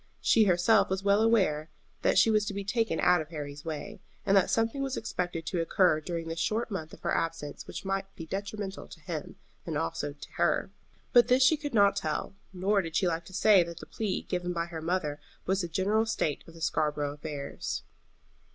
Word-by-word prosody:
She 220 -2 +4
herself 195 +3 +4
was 190 +1 -1
well 200 +1 +4
aware 185 -9 +2 0.3
that - - +2
she 225 - +6
was 215 -1 +3
to 200 - -3
be 200 - -3
taken 225 -4 0
out 180 -2 +4
of 155 - -8
Harry's 145 -2 -6
way, 155 -3 -6 0.2
and 195 - +4
that 195 - +4
something 225 +4 +1
was 270 -1 -2
expected 175 -6 -3
to 170 +1 -1
occur 165 -1 +3
during 165 0 -4
this 165 0 -4
short 220 +5 0
month 160 -5 -4
of - - -13
her - - -1
absence 165 -3 -3
which - - -7
might 195 0 -1
be 165 - -7
detrimental 195 +2 -5
to - - -12
him, - - -6 0.3
and - - -4
to - - +1
her - - +1 0.8
also. - - -10 0.4
But 240 -2 +7
this 255 +1 +5
she 290 +5 +6
could 290 -4 -5
not 200 -1 +5
tell, 155 -1 -2 0.2
nor 195 +2 +1
did 165 -2 -7
she 185 - +3
like 170 0 -1
to 190 - -13
say 195 0 +6
that 170 -1 -4
the - - -9
plea 210 -4 -3
given 180 -1 -2
by 170 -1 -1
her 165 -2 -7
mother 160 -3 -1 0.3
was 190 +1 +1
the 175 - -2
general 205 +7 +1
state 160 -9 -1
of 165 - -13
the 165 - -12
Scarborough 150 -2 0
affairs. 145 - -5
185 Hz, 215 wpm, -29 LUFS, 165-205 Hz, 0.8 s, But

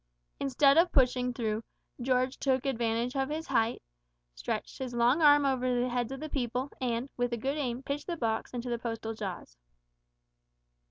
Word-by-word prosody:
Instead 275 +2 +4
of 345 +1 +4
pushing 250 -1 +3
through, 225 -2 -2 0.4
George 255 +1 +1
took 265 -1 +1
advantage 235 -1 0
of 270 0 0
his 315 +2 -3
height, 230 -3 +1 0.5
stretched - - -4
his 255 -2 -4
long 240 +7 +3
arm 290 -1 +7
over 255 -2 +1
the 250 +1 +1
heads 245 0 -1
of 270 - -5
the 310 - -5
people, 255 -1 -2
and, 240 0 -1
with 245 0 0
a - - 0
good 270 +5 -1
aim, 260 -3 -2
pitched 285 +2 -4
the 345 -2 -2
box 225 -5 -1
into 245 0 -5
the 235 - -1
postal 225 -1 -4
jaws. 185 - -6
250 Hz, 175 wpm, -30 LUFS, 235-275 Hz, 0.5 s, arm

